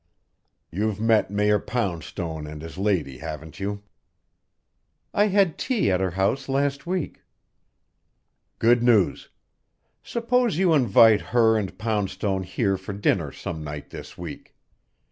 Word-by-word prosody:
You've 105 +3 -1
met 110 -2 +3
Mayor 105 +1 +2
Poundstone 85 -7 -4
and 75 0 -8
his 80 +3 -8
lady, 85 -11 0
haven't 80 0 -8
you?" 100 +1 -4 1.3
"I 205 +1 +3
had 195 -4 +2
tea 235 - +1
at 90 - +2
her 95 - +1
house 100 +10 -1
last 140 +2 -1
week." 180 -3 -3 1.4
"Good 120 +1 +4
news. 115 -6 +2 0.7
Suppose 235 -4 0
you 180 -2 +3
invite 115 -5 +5
her 115 -2 +3
and 100 -4 -3
Poundstone 100 -2 -1
here 95 +2 -1
for 95 +2 -7
dinner 95 -6 0
some 80 +3 -6
night 75 -1 -7
this - - -10
week. - - -9
105 Hz, 125 wpm, -24 LUFS, 90-125 Hz, 1.4 s, invite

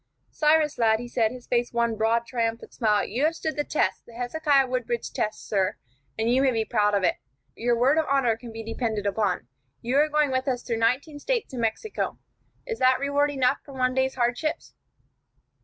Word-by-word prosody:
"Cyrus, 305 -2 +2
lad," 220 -1 +3
he 245 - -6
said, 235 -2 +1
his 250 -1 -10
face 240 0 0
one 235 -1 +1
broad, 225 +2 +1
triumphant 230 -1 -3
smile, 210 -4 +2
"you 245 +7 -2
have 325 +1 +1
stood 315 -1 -3
the 295 - 0
test, 305 - -1
the 235 - -14
Hezekiah 275 +3 +2
Woodbridge 250 -2 -3
test, 215 - -3
sir, 195 -1 0 0.4
and 220 - 0
you 250 +3 +3
may 270 - +4
be 225 -3 0
proud 210 -3 +2
of 200 - +1
it. - - +2 0.4
Your 240 0 +1
word 270 +6 +4
of 315 - 0
honor 270 -5 +3
can 230 +1 -10
be 225 0 -7
depended 225 -2 -3
upon. 200 - 0 0.4
You 250 +4 +1
are 300 +1 +4
going 300 -2 +2
with 260 +1 -1
us 250 -2 -1
through 230 -2 -2
nineteen 265 +6 0
States 475 - -2
and 245 - -3
Mexico. 230 - -2 0.5
Is 460 -2 -4
that 255 0 +4
reward 285 +1 +1
enough 265 -1 +1
for 280 - -12
one 255 -1 +1
day's 265 0 0
hardships?" 255 +6 -1
245 Hz, 205 wpm, -26 LUFS, 225-280 Hz, 0.5 s, may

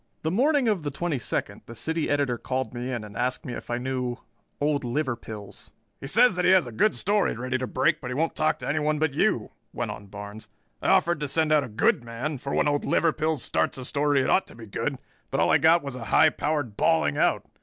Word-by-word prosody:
The 160 - 0
morning 270 - +2
of 205 -5 +1
the 150 - -3
twenty 150 0 -2
second - - -3
the 115 - -9
City 160 +6 -2
Editor 140 -4 0
called 130 -3 -3
me 125 +1 -4
in 120 -4 -3
and 105 -1 -11
asked 125 +1 -2
me 125 - -5
if - - -8
I 120 - 0
knew 125 -1 -3 0.4
"Old 145 -1 0
Liverpills." 120 -6 -4 0.3
"He 135 - -7
says 230 - +4
that 180 - 0
he - - +5
has 185 -5 +5
a 120 - -7
good 210 - +2
story 205 - +1
ready 130 +2 -2
to 130 - -3
break 155 +7 +1
but 125 - -5
he 125 - -3
won't 160 +4 0
talk 155 - +1
to - - -7
anyone 150 0 0
but 155 -2 0
you," - - +1 0.2
went - - -3
on 100 - -9
Barnes. 105 +2 -9 0.3
"I - - 0
offered 170 0 +3
to 150 - -2
send 155 +2 +1
out 150 -2 +4
a 125 - -7
good 110 +2 +2
man, 125 +5 -4
for 140 - -5
when - - +2
Old 145 0 +1
Liverpills 155 -3 +1
starts - - 0
a 130 - -6
story 145 0 +1
it - - 0
ought 190 - +3
to - - -13
be 115 -1 -10
good, 135 +6 -3 0.3
but 135 - -1
all - - +3
I - - +5
got 160 +2 +5
was 140 -2 -5
a 120 -3 -7
high 155 +8 +5
powered 145 -9 -2
bawling 75 -6 +2
out. - - +2
140 Hz, 245 wpm, -26 LUFS, 120-155 Hz, 0.4 s, he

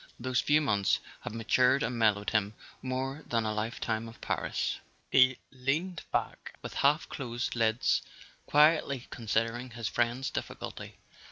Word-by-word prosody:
Those 130 0 0
few 150 +1 +4
months 100 -8 +2 0.2
had - - -7
matured 125 +5 +3
and 125 - -1
mellowed 105 -3 +2
him 105 -1 +1 0.3
more 135 +3 -3
than 115 -2 0
a 110 - 0
lifetime 110 +1 -2
of 115 - -14
Paris. - - -2 0.3
He 130 -1 +6
leaned 150 +7 -1
back - - -3
with - - -6
half 145 +3 +2
closed 120 -3 -4
lids, 115 +1 +2 0.5
quietly 150 -3 +4
con¬ 115 -3 -8
sidering 115 +2 0
his 115 -2 -3
friend's 120 +2 0
difficulty. - - -6
120 Hz, 145 wpm, -30 LUFS, 115-135 Hz, 0.5 s, He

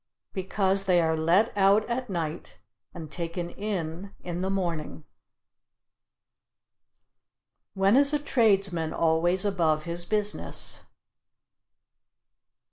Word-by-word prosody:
Because 195 0 0
they 180 -2 +4
are 160 -1 +2
let 170 +8 +2
out 200 +2 +4
at 250 0 -3
night 165 -4 -4 0.3
and 160 -3 -9
taken 170 0 -4
in 195 -2 -5
in 175 0 -4
the 190 - -1
morning. 165 - -3 2.7
When 195 +3 +3
is 280 +1 +6
a 300 - +2
tradesman 195 - +1
always 170 +4 +2
above 165 -6 +1
his 170 +1 -4
business? 210 0 -2
185 Hz, 100 wpm, -27 LUFS, 165-200 Hz, 2.7 s, is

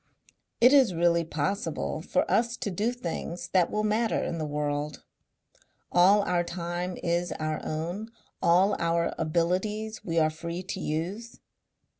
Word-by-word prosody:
It 250 +3 +7
is 255 -10 +5
really 170 0 +3
possible 165 +5 -2
for - - 0
us 235 +1 +1
to 205 - -3
do 210 +6 0
things 175 -5 -5
that 180 -2 +3
will 215 - -1
matter 215 +2 +1
in 165 - -2
the 155 - -2
world. 145 0 -3 0.9
All 195 +4 +5
our 180 -2 +1
time 175 +1 -4
is 175 0 0
our 155 0 -3
own; 175 +8 -4 0.3
all 185 +4 +4
our 170 0 +1
abilities 185 +7 -1
we 165 -2 -2
are 155 -1 +4
free 170 +3 -5
to 190 +1 -5
use. 185 +9 -4
175 Hz, 145 wpm, -28 LUFS, 165-205 Hz, 0.9 s, It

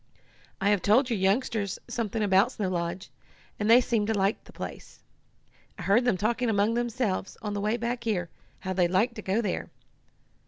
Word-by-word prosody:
"I 200 +1 +2
have 205 -3 +2
told 245 +5 +3
your 220 - 0
youngsters 200 0 0
something 225 -1 -2
about 195 -1 +3
Snow 200 -3 -2
Lodge, 175 +1 -3 0.5
and 210 +1 0
they 235 +2 +9
seemed 230 -4 0
to 220 - +1
like 195 +2 0
the - - -14
place. - - -9 0.7
I - - -7
heard 225 +5 +3
them 230 -7 +2
talking 235 +4 0
among 210 +1 +2
themselves, 235 -5 -2
on 210 -1 -3
the 205 - -2
way 215 +3 0
back 235 0 -3
here, 185 -7 -1 0.3
how 185 -1 -3
they'd 180 -2 +2
like 210 +7 +2
to 215 - -7
go 200 +3 0
there. - - -2
210 Hz, 190 wpm, -27 LUFS, 190-235 Hz, 0.7 s, they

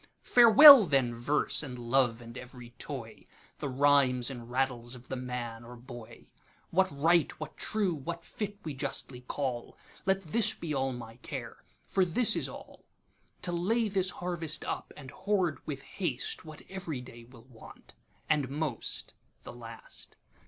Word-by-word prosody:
'Farewell 245 0 +10
then 135 -5 +2
Verse, 120 +6 0
and 130 -4 -7
Love, 120 -1 +1
and 115 0 -11
ev'ry 125 -1 -10
toy, - - -8 0.3
The - - -3
rhymes 135 -2 +3
and 120 -2 -9
rattles 125 -1 -1
of 125 0 -15
the - - -3
Man 125 -2 -5
or 120 +1 -11
Boy; 120 -1 -12 0.5
What 190 +2 +3
right, 165 +3 +3
what 155 - -7
true, 205 -5 0
what 165 +3 -6
fit, 205 -1 -5
we 155 - -5
justly 135 -2 -4
call, 125 -1 -4 0.3
Let 190 0 +2
this 210 +7 +4
be 165 -3 -5
all 135 -1 0
my 115 -2 -9
care—for 135 +8 -4
this 185 +7 +3
is - - -1
all; - - -12 0.6
To 175 - 0
lay 215 +6 0
this 190 -2 0
harvest 175 -4 -4
up, - - -4
and 135 -3 -10
hoard 190 -5 0
with 140 -3 -5 0.2
hasteWhat 155 -1 -4
ev'ry 175 -9 -5
day 120 -1 -12
will 120 -1 -17
want, 125 -4 -15 0.3
and 150 -4 +1
most 145 -4 -4 0.3
the - - -9
last. 115 -1 -11
140 Hz, 150 wpm, -30 LUFS, 125-175 Hz, 0.6 s, Farewell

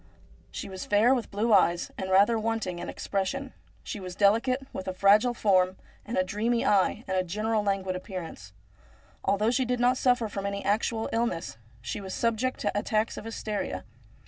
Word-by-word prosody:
She - - -6
was 190 -1 -6
fair, 215 +5 +4
with 245 -4 -2
blue 215 +3 +1
eyes, 175 -3 +3
and 190 - -4
rather 200 +5 +5
wanting 220 -5 -2
in - - -5
expression. 255 +8 -3 0.3
She 210 - -5
was 180 -2 -7
delicate, 235 +7 +2
with 190 - -6
a 185 - -3
fragile 210 +6 +4
form 185 -3 +2 0.3
and 230 - -3
a 185 - +4
dreamy 225 +5 0
eye 205 +3 +2
and 190 - -1
a 185 - +2
general 215 +5 -1
languid 195 -2 -1
appearance. 180 - -7 0.8
Al 200 - +3
though 215 +3 +2
she 255 +1 +2
did 250 0 -1
not 250 +1 +3
suffer 245 -3 +2
from 200 -1 -4
any 200 0 -4
actual 220 +2 0
illness, 205 - -2 0.2
she 120 - -5
was 190 -1 -6
subject 235 +2 0
to 205 - -1
attacks 215 +2 0
of - - -8
hysteria. 210 - -4
205 Hz, 185 wpm, -28 LUFS, 190-230 Hz, 0.8 s, rather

